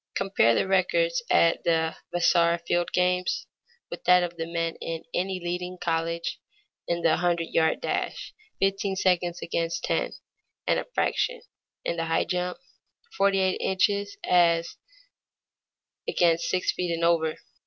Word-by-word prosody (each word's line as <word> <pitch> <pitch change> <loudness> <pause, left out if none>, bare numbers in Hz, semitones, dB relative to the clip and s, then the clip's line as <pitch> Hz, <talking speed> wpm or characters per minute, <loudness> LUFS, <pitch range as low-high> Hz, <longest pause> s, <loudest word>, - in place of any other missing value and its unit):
Compare 195 -13 +3
the - - +1
records - - +2
at 165 - +3
the 160 -1 +1 0.2
Vassar 170 -1 +3
field 175 0 0
games 180 0 +1 0.5
with - - -7
that 180 0 +6
of 175 -1 -4
the 165 -1 -4
men 165 -1 -1
in 165 -1 -5
any 185 +1 -1
leading 180 +1 -4
college: 165 0 -2 0.5
in 170 0 -1
the 160 -1 +4
hundred 170 -1 0
yard 160 -1 +2
dash, - - -3 0.3
fifteen 195 0 0
seconds 180 -2 +1
as - - -10
against 165 0 -2
ten - - -1 0.5
and - - +2
a - - -5
fraction; - - 0 0.4
in 170 - -1
the 165 - -1
high 165 0 +1
jump, 180 0 -2 0.6
forty 195 0 +3
eight 190 0 0
inches 200 +1 0
as 170 -2 +3 1.3
against 170 -1 +2
six 185 - +1
feet 180 -1 -3
and 165 0 -2
over. 165 -2 +2
175 Hz, 145 wpm, -26 LUFS, 165-185 Hz, 1.3 s, that